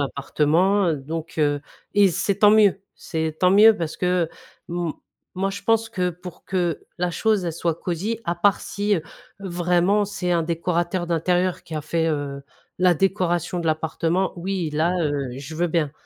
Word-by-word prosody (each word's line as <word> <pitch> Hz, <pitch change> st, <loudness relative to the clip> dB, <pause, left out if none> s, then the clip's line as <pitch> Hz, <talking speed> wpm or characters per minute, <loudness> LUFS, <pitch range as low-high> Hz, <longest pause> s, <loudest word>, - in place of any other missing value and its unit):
appartement, 160 Hz, +8 st, +1 dB
heu, 155 Hz, -, +1 dB
donc, 160 Hz, +4 st, -6 dB
heu 145 Hz, -1 st, +2 dB, 0.3 s
et 200 Hz, -1 st, +6 dB
c'est 195 Hz, +3 st, 0 dB
tant 210 Hz, -, +7 dB
mieux. 210 Hz, -2 st, +5 dB
C'est 160 Hz, -2 st, -3 dB
tant 180 Hz, -, +4 dB
mieux 210 Hz, +3 st, +7 dB
parce 165 Hz, -2 st, -4 dB
que 180 Hz, -2 st, +1 dB, 0.4 s
m 170 Hz, -2 st, -2 dB, 0.4 s
moi, 195 Hz, +1 st, 0 dB
je 200 Hz, +1 st, -7 dB
pense 225 Hz, +1 st, +2 dB
que, 180 Hz, -5 st, -1 dB
pour 180 Hz, +1 st, -11 dB
que 175 Hz, -4 st, -1 dB
la 180 Hz, -1 st, -1 dB
chose, 215 Hz, -3 st, +1 dB
elle 170 Hz, -, -2 dB
soit 165 Hz, 0 st, -1 dB
cosy 185 Hz, +7 st, -3 dB
à 170 Hz, -, -1 dB
part 195 Hz, +3 st, +2 dB
si, 205 Hz, 0 st, -1 dB
heu, 160 Hz, -, -4 dB, 0.4 s
vraiment 180 Hz, +2 st, +1 dB
c'est 180 Hz, -3 st, -2 dB
un 170 Hz, -1 st, +2 dB
décorateur 170 Hz, +2 st, -1 dB
d'intérieur 175 Hz, +2 st, 0 dB
qui 160 Hz, -, -9 dB
a -, -, -2 dB
fait, 165 Hz, +2 st, 0 dB
heu, 140 Hz, -2 st, -3 dB, 0.4 s
la 180 Hz, -1 st, +4 dB
décoration 180 Hz, -1 st, 0 dB
de 165 Hz, -, -4 dB
l'appartement, 165 Hz, +3 st, 0 dB
oui, 180 Hz, -2 st, -2 dB
là, 165 Hz, +4 st, +1 dB
heu, 150 Hz, -3 st, 0 dB, 0.3 s
je 145 Hz, +3 st, -8 dB
veux 175 Hz, +2 st, 0 dB
bien. 155 Hz, -3 st, 0 dB
175 Hz, 180 wpm, -23 LUFS, 160-190 Hz, 0.4 s, tant